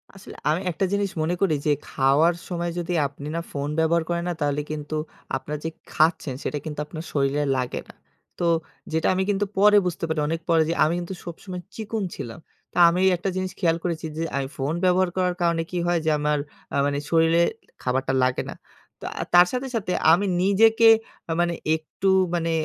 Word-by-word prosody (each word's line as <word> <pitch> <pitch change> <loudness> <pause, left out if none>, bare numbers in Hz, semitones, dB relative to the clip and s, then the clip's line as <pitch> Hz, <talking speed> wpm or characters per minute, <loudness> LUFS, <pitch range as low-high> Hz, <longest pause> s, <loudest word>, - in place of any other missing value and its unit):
আসলে 195 - -13 0.2
আমি 165 +4 +1
একটা 185 +4 0
জিনিস 200 -1 0
মনে 170 +3 0
করি 170 -6 +3
যে 150 - +3 0.2
খাওয়ার 140 +6 +3
সময় 175 -1 -2
যদি 175 +1 -3
আপনি 140 +1 -10
না 170 - -1
ফোন 145 0 -3
ব্যবহার 165 +1 +2
করেন 170 0 -1
না? - - 0
তাহলে 145 0 +1
কিন্তু 155 0 -4 0.4
আপনারা 150 +3 -4
যে 165 - -1 0.2
খাচ্ছেন, 155 -4 +2
সেটা 150 - -2
কিন্তু 150 -2 -5
আপনার 155 +1 -7
শরীরে 140 +1 +1
লাগে 125 -1 -2
না। - - -12 0.5
তো 175 - 0 0.5
যেটা 160 0 +1
আমি 190 +1 +1
কিন্তু 205 0 +1
পরে 210 +1 +6
বুঝতে 175 - -3
পারি, 160 -1 -1
অনেক 165 +2 -2
পরে। 165 -1 +5
যে 165 - +1
আমি 155 +2 +2
কিন্তু 175 +2 -5
সবসময় 180 +1 -7
চিকন 220 -1 -3
ছিলাম। 115 +4 -7 0.3
তা - - -8
আমি 175 +2 0
এই 190 - +5
একটা 190 +3 -2
জিনিস 185 0 -2
খেয়াল 165 -3 +2
করেছি 165 -2 -2
যে, 165 - -1 0.2
আই 135 - -2
ফোন 140 +4 -2
ব্যবহার 185 0 +3
করার 180 -1 +1
কারণে 170 -1 +2
কি 180 - -2
হয়? 175 -1 +2
যে - - +3
আমার 150 0 +1 0.4
আ - - +2
মানে 145 0 0
শরীরে 165 +1 +4 0.4
খাবারটা 130 +1 0
লাগে 130 0 +1
না। - - -6 0.5
তা - - -5 0.3
তার 175 0 +8
সাথে, 255 +1 -2
সাথে 195 -5 -2 0.2
আমি 180 +5 +4 0.2
নিজেকে 225 +3 +5 0.4
আ - - -1
মানে 175 0 +1 0.2
একটু 160 +4 -2 0.3
মানে 165 -1 0
165 Hz, 200 wpm, -24 LUFS, 150-180 Hz, 0.5 s, তার